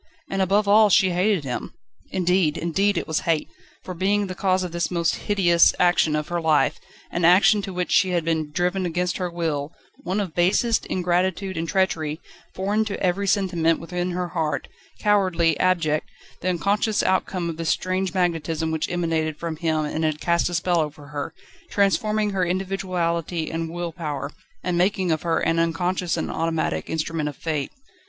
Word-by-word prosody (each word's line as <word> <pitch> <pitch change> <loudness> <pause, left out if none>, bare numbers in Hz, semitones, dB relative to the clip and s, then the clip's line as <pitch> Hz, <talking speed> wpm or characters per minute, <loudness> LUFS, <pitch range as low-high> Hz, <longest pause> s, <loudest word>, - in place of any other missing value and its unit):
And, 195 0 0
above 200 +2 +2
all, 210 +1 +6
she 190 -1 +4
hated 185 -1 +1
him 125 -3 -5 0.3
indeed, 180 -3 +1
indeed 195 +5 +1
it - - -2
was 160 -1 0
hate! 160 -2 +1 0.4
for 185 - -6
being 200 +4 +1
the 185 - -5
cause 185 0 +1
of 180 - -4
this 170 0 -1
most 170 -2 +1
hideous 175 -5 +3
action 175 -3 +3
of 150 0 -2
her 175 0 -1
life: 155 -2 +2 0.3
an 175 - -2
action 195 +4 +6
to 195 - -6
which 180 -1 -3
she 190 - +4
had 175 -2 0
been 160 -2 0
driven 180 +3 0
against 175 +1 -1
her 180 -2 -2
will, 160 -4 -2 0.3
one 185 +3 -2
of 190 -6 -3
basest 195 +7 +2
ingratitude 185 +1 0
and 165 0 -3
treachery, 160 -5 0 0.4
foreign 205 +3 +1
to 205 - -4
every 190 +2 0
sentiment 175 -5 +2
within 180 +1 -3
her 180 0 -2
heart, 160 -3 -2 0.3
cowardly, 185 -6 +2
abject, 165 -5 +1 0.3
the 185 - 0
unconscious 200 +4 +1
outcome 185 -1 0
of 165 -2 -4
this 165 -1 -2
strange 185 0 0
magnetism 165 -3 -1
which 160 -1 -2
emanated 165 -3 -1
from 165 -1 -4
him 160 -2 0
and 155 +2 -3
had 155 -1 0
cast 170 +1 +1
a 175 - -3
spell 175 +1 +1
over 150 -2 -4
her, 145 -1 -4 0.4
transforming 210 +1 +1
her 190 -2 0
individuality 175 -3 -2
and 165 0 -3
will 175 0 -4
power, 150 -4 -4 0.3
and 175 -1 0
making 185 -1 +1
of 155 - 0
her 165 -1 0
an 165 0 +1
unconscious 175 +1 0
and - - -2
automatic 165 -1 -1
instrument 160 -1 -2
of 145 - -9
Fate. 155 -2 -2
175 Hz, 180 wpm, -23 LUFS, 165-190 Hz, 0.4 s, all